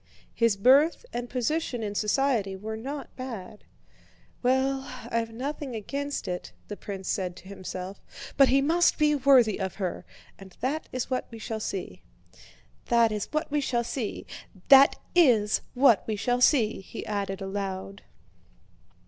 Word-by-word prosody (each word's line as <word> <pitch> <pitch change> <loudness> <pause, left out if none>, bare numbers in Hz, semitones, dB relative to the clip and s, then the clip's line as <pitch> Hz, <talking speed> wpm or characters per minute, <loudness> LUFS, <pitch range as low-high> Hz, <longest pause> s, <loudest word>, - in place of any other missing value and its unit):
His 230 -3 +2
birth 275 - +4
and 240 0 -4
position 250 -1 -1
in 205 -1 -3
society 215 -2 +1
were 215 +3 -6
not 275 +6 -7
bad. 225 -6 -8 0.8
"Well, 265 +2 +1 0.3
I've 230 -1 -1
nothing 270 +2 -5
against 280 +6 -4
it," 180 0 -5 0.2
the 205 - -4
prince 195 -2 -7
said 185 -4 -2
to 185 - -14
himself, 190 0 -7 0.3
"but 275 -1 +6
he 275 +1 +4
must 340 +4 +3
be 300 -1 +3
worthy 260 -7 +4
of 190 -2 -3
her. 185 -3 -3 0.4
And 190 -2 -14
that 285 +5 -2
is 255 +1 -4
what 255 - -1
we 230 - -9
shall 220 0 -5
see." 185 - -5 0.9
"That 235 -1 +4
is 210 -1 -2
what 305 0 -2
we 295 0 +1
shall 240 -3 0
see! 235 -2 -4 0.4
That 275 0 +8 0.2
is 235 -12 +4
what 245 -5 +5
we 220 - -1
shall 245 +4 0
see!" 240 -5 +4
he 190 - -8
added 200 -2 -3
aloud. 195 0 -5
230 Hz, 150 wpm, -27 LUFS, 200-270 Hz, 0.9 s, That